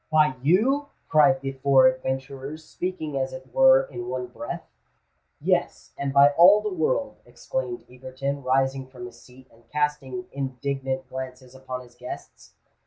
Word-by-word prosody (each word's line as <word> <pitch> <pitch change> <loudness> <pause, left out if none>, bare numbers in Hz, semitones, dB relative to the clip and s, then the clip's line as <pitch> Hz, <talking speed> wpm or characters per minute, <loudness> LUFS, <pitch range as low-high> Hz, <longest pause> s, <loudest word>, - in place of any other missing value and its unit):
"By 155 -3 +4
you!" 240 - +3 0.2
cried 140 -4 +5
the 135 0 -3
four 135 0 +4
adventurers, 135 +3 -2
speaking 160 -6 -4
as 130 0 -2
it 175 - -10
were - - +6
in 370 -7 -7
one 370 - -3
breath. - - -7 0.8
"Yes—and 140 -1 -1
by 140 +1 +7
all 180 +7 +7
the 210 -2 -3
world," 265 - 0
exclaimed 445 -8 -5
Egerton, 130 +2 -5
rising 135 0 +1
from 125 -2 -10
his 120 - -12
seat, 130 +1 -17
and 115 +1 -24
casting 150 -4 -2
indignant 135 0 -3
glances 130 -1 -8
upon 130 -1 -6
his 125 -1 -16
guests. - - -10
135 Hz, 145 wpm, -25 LUFS, 130-160 Hz, 0.8 s, by